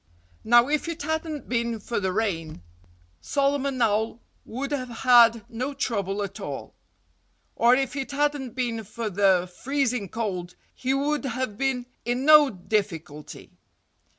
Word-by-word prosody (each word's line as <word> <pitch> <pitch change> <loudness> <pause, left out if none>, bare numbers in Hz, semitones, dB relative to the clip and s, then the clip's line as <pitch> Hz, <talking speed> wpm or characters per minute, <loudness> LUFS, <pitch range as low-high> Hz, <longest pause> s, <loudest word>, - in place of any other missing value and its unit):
Now, 240 +2 +5
if 300 +2 0
it 335 -3 -5
hadn't 315 -1 -3
been 235 -1 -1
for 230 +2 -3
the 190 -2 -1
rain, 165 - -2 0.6
Solomon 280 -1 0
Owl 220 0 +1 0.3
would 270 +5 -5
have 255 -3 -2
had 235 -2 +5
no 255 +5 -4
trouble 205 -7 -2
at 195 -1 -7
all. - - -6 0.8
Or 240 +2 +5
if 265 0 -1
it 270 -1 -3
hadn't 285 -3 -1
been 235 -3 -2
for 215 +1 -5
the 190 -2 +3
freezing 250 -7 -1
cold 185 -5 -4 0.2
he 255 - -2
would 290 +1 0
have 255 -4 -3
been 260 0 -1 0.2
in 245 +3 -1
no 300 -2 +8
difficulty. 175 - -4
240 Hz, 140 wpm, -25 LUFS, 205-275 Hz, 0.8 s, no